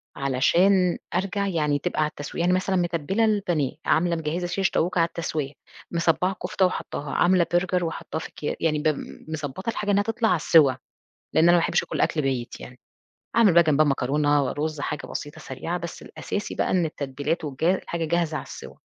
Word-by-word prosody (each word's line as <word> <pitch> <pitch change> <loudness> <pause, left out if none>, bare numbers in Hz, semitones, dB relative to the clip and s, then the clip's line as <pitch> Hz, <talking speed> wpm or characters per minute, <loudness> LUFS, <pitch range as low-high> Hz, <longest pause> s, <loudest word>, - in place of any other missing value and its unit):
علشان 175 +8 +3 0.2
أرجع 195 +2 0
يعني 150 -6 0
تبقى 180 -1 -1
على 150 - +2
التسوية. 145 +2 -6
يعني 180 +1 +3
مثلًا 190 +1 0
متبِّلة 175 +4 +1
البانيه، 180 -10 0
عاملة 170 +1 +2
مجهِّزة 165 +2 -2
شيش 190 +1 0
طاووق 180 +3 0
على 165 -1 +4
التسوية، 155 -4 -4 0.4
مصبّعة 170 +2 +1
كفتة 190 - +1
وحطّاها، 150 -5 -3
عاملة 175 -1 +3
برجر 180 0 +1
وحطّاه 165 -1 -4
في - - -6
أكيا 150 - -4
يعني 155 -2 +1
ب 155 - 0 0.4
مضبّطة 155 +5 -4
الحاجة 210 -2 -1
إنها 200 0 +3
تطلع 225 +1 0
على 180 - +4
السِّوى، 155 -4 +4 0.6
لإن 160 - +4
أنا 175 - +7
ما 175 - +5
باحبش 170 - +1
آكل - - -3
أكل 155 - +1
بايت 130 -4 -3
يعني، 125 0 -11 0.6
أعمل 225 -5 +6
بقى 170 - +8
جنبها 155 -1 +3
مكرونة 145 +1 +2
ورُز 150 +3 -3
حاجة 150 0 -4
بسيطة، 145 0 -6
سريعة، 165 +7 -4
بس 170 -1 -7
الأساسي 205 - -5
بقى - - 0
إن 180 -2 +2
التتبيلات 145 +2 -3
والجا 155 +5 +1
الحاجة 170 -3 -4
جاهزة 165 -1 0
على - - -5
السِّوى. - - -10
165 Hz, 185 wpm, -25 LUFS, 150-180 Hz, 0.6 s, بقى